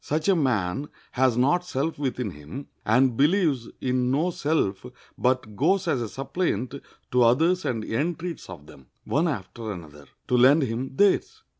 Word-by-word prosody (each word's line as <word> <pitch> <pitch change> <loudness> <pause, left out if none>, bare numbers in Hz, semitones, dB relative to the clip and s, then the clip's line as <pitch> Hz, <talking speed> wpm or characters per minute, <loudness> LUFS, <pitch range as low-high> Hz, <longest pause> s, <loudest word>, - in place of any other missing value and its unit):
Such 155 +1 -1
a 195 - +5
man 130 - 0 0.2
has 130 -2 +2
not 145 +8 +3
self 160 -2 -3
within 125 -6 -2
him, 75 - -9 0.2
and 125 +3 +4
believes 145 - +2
in 125 -1 0
no 155 +7 +1
self, 145 - -1 0.3
but 125 -4 0
goes 180 - +2
as 135 -6 +1
a 115 - -3
suppliant 135 - -2 0.4
to 125 - +3
others 160 +10 +3
and 115 -4 -2
entreats 165 +7 -3
of 75 - -10
them, 65 -3 -16 0.2
one 160 +5 +1
after 115 - -4
another, 75 -6 -10 0.2
to 125 - +1
lend 135 +5 +6
him 130 +2 -3
theirs. 205 - +2
130 Hz, 160 wpm, -25 LUFS, 115-160 Hz, 0.4 s, lend